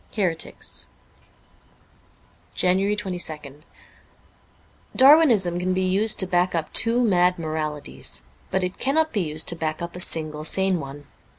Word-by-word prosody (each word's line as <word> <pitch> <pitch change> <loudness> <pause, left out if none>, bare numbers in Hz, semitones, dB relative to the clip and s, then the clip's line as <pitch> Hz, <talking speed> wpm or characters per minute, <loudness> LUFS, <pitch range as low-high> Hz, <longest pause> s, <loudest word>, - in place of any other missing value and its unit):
' - - -20
Heretics* 175 -6 -2 1.7
JANUARY 190 +3 +1
22nd 160 -8 -6 1.3
DARWINISM 255 - +5
can 185 +1 -1
be 185 - 0
used 200 +4 +2
to - - -1
back 180 0 0
up 160 -2 -4
two 235 +2 +3
mad 180 -4 +2
moralities, 155 - -4 0.3
but 190 - -1
it 180 +1 -4
cannot 315 +4 0
be 210 - 0
used 155 -2 -1
to 170 - +2
back 155 -2 -4
up 170 0 -7
a - - -7
single 155 -3 +2
sane 190 +2 +3
one. 140 0 -9
180 Hz, 135 wpm, -23 LUFS, 155-195 Hz, 1.7 s, DARWINISM